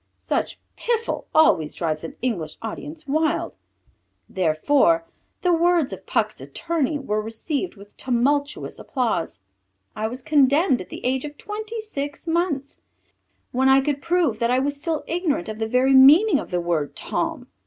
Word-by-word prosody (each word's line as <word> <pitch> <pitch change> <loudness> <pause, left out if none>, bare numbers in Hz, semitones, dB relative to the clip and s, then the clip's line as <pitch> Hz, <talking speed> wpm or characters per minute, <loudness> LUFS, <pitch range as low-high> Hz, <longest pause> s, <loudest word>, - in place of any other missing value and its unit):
Such - - -2 0.2
piffle 465 -1 -2
always 165 - +3
drives 155 -2 -2
an 165 - -7
English 170 -11 -2
audience 295 +8 -7
wild. 310 +3 0 0.7
Therefore 270 - +2 0.4
the 360 -1 +3
words 340 -3 +2
of - - -10
Puck's - - -1
attorney 320 -3 -2
were 215 -7 -2
received 255 - -3
with 205 0 -15
tumultuous 285 +4 0
applause. 225 - -2 0.5
I 215 +1 -1
was 250 +3 -5
condemned 290 0 +3
at - - -10
the - - -8
age 260 +1 0
of 295 0 -8
twenty 435 +2 -6
six 290 -10 -5
months, 325 -5 -1 0.7
when 265 +2 +2
I 265 0 +7
could 280 0 -1
prove 335 -9 +1
that 235 - +1
I 260 +3 +2
still 295 +3 -2
was - - -20
ignorant 330 - -1
of 215 0 -6
the 220 - -1
very 255 +3 +3
meaning 295 +7 +7
of - - -7
the 180 - 0
word, 165 -4 -1
Tom. - - -3
275 Hz, 155 wpm, -23 LUFS, 225-325 Hz, 0.7 s, I